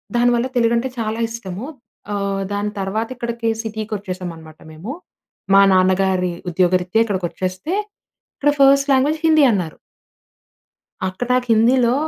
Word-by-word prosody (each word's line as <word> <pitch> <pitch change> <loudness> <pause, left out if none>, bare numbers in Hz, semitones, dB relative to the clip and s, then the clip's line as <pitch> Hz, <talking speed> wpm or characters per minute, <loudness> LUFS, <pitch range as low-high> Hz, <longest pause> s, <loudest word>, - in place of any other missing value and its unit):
దానివల్ల 240 +1 +2
తెలుగంటే 235 +1 +2
చాలా 220 0 -2
ఇష్టము. 225 -1 -6 0.5
ఆహ్, 200 -1 -2
దాని 205 +1 -2
తర్వాత 205 +4 -2
ఇక్కడికి 235 -1 -3
సిటీకొచ్చేసామనమాట 185 -7 -6
మేము. 165 +10 -7 0.6
మా 195 - +8
నాన్నగారి 185 -1 +2 0.2
ఉద్యోగరీత్యా 180 +4 +2
ఇక్కడికొచ్చేస్తే 185 - -3 0.6
ఇక్కడ 290 +1 +2
ఫర్స్ట్ 275 +1 +5
లాంగ్వేజ్ 290 +4 +2
హిందీ 315 -2 +5
అన్నారు. 180 -7 -2 1.3
అక్కడ 185 +6 -4
నాకు 250 -1 0
హిందీలో 240 +2 +3
215 Hz, 110 wpm, -20 LUFS, 185-240 Hz, 1.3 s, మా